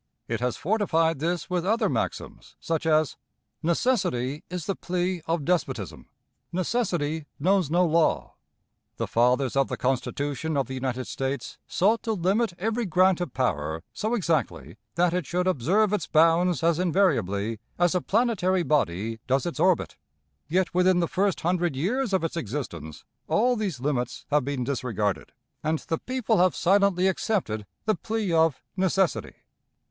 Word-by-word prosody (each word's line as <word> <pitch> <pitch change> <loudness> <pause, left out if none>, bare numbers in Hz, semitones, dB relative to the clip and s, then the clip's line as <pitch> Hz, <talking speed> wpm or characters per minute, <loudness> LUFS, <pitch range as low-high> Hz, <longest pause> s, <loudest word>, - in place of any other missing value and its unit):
It 115 -1 -2
has 125 0 -1
fortified 165 -5 +1
this 170 +3 -1
with 180 -2 -1
other 220 +5 +2
maxims, - - -4
such 160 -1 -2
as, 155 -3 +2 0.4
"Necessity 165 - 0
is 180 -3 -4
the 195 - -1
plea 180 0 -2
of 165 -3 -1
despotism"; 130 - -2 0.4
"Necessity 175 -6 -1
knows 185 0 +2
no 175 +3 +3
law." 165 -1 +1 0.6
The - - -1
fathers 125 +3 +2
of 135 -1 +3
the - - -4
Constitution 145 +4 -1
of 135 - +1
the 130 - -7
United 130 -1 -3
States 135 -1 -4
sought 215 +5 +2
to 225 - -1
limit 195 +3 +1
every 225 +3 -1
grant 185 +1 +3
of 175 -8 -4
power 80 - -1
so 220 +3 -1
exactly 165 - -1 0.2
that 175 0 +2
it 180 -6 -1
should 180 +1 0
observe 185 - +2
its 190 -7 -1
bounds 165 +1 +3
as 170 0 +3
invariably 115 - +1 0.2
as 175 0 +3
a 180 - +1
planetary 190 -5 +1
body 115 - 0
does 135 +4 +1
its 170 -3 -4
orbit. 175 - +2 0.5
Yet 180 +4 0
within 180 0 +4
the 170 - +1
first 195 +1 0
hundred 175 -3 0
years 220 - 0
of 190 -3 +1
its 165 - -2
existence 100 - -5 0.2
all 245 +3 +3
these 200 - -3
limits 125 -3 -2
have 145 -2 +3
been 140 -3 -2
disregarded, 110 - -2 0.3
and 155 +1 +1
the 165 +1 -3
people 245 -5 0
have 180 0 +3
silently 190 0 +3
accepted 175 - -1 0.2
the 215 - +3
plea 215 -4 -2
of 160 -4 +2
necessity. 190 -4 +1
170 Hz, 155 wpm, -26 LUFS, 135-185 Hz, 0.6 s, within